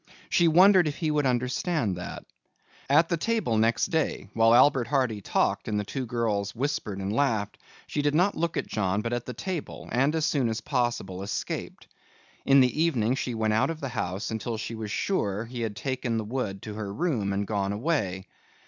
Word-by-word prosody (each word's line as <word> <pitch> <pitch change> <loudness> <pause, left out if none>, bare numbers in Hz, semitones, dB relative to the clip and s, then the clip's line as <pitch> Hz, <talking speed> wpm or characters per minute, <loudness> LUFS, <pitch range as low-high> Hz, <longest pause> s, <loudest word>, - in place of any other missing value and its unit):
She 175 - +4
wondered 180 +1 +6
if 145 - -3
he 160 -3 0
would 150 -2 +2
understand 125 - 0
that. 90 - -7 0.6
At 155 +4 +5
the 170 - +1
table 190 - 0
next 115 +1 +2
day 160 -2 -1
while 115 +1 +5
Albert 130 -1 +5
Hardy 130 -7 0
talked - - 0
and 105 -1 0
the - - -1
two 130 +5 -4
girls 110 -4 -1
whispered 120 -6 -2
and 100 +1 -3
laughed, 110 -6 0 0.3
she 145 - -2
did 145 0 +1
not 180 +5 +3
look 170 0 -2
at - - -1
John 100 0 -1
but 120 0 -2
at 120 0 -3
the 125 - -4
table 170 +6 -5
and 135 +6 +2
as 160 -1 +1
soon 135 -8 +1
as 110 0 -2
possible 120 -7 -2
escaped. 100 +2 -4 0.6
In 135 0 +7
the 130 +4 +2
evening 125 -8 +2
she 125 -2 -2
went 110 -1 +1
out 110 - +2
of 165 -1 -4
the 135 - -4
house 100 -4 -3
until 110 +1 -3
she 115 - -5
was 110 -2 -5
sure 105 - -1
he 120 +1 -6
had 110 -3 -2
taken 125 +1 -2
the 110 - -1
wood 105 -5 -3
to 105 - -6
her 105 -2 -5
room 120 - -1
and 100 +1 -1
gone 100 -1 -1
away. 100 - -1
120 Hz, 200 wpm, -27 LUFS, 105-145 Hz, 0.6 s, In